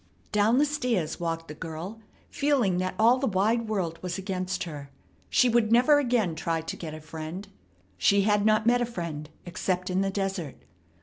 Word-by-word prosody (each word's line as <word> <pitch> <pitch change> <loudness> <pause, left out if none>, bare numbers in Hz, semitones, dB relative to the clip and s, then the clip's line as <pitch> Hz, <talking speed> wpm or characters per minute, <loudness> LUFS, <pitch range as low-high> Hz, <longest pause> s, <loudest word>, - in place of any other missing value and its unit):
Down 210 +3 +3
the 290 - +5
stairs 250 - -1
walked 165 -1 -3
the 150 - -7
girl, 165 +7 -7 0.3
feeling 255 -11 +1
that 185 0 -2
all 235 +4 +5
the 270 - 0
wide 220 +4 +1
world 180 -6 -2
was 180 -1 -3
against 185 -1 -3
her. 145 -5 -8 0.4
She 250 - +4
would 235 -2 +2
never 255 +5 +6
again 240 - +1
try 165 0 -2
to 165 - -5
get 155 -2 -7
a - - -8
friend. 160 +5 -7 0.5
She 200 0 +4
had 210 0 +2
not 215 0 +3
met 245 +1 +4
a - - +2
friend 165 -8 -5 0.2
except 180 +1 -2
in 185 +1 +1
the 195 - +1
desert. 195 -6 -3
195 Hz, 185 wpm, -27 LUFS, 165-230 Hz, 0.5 s, never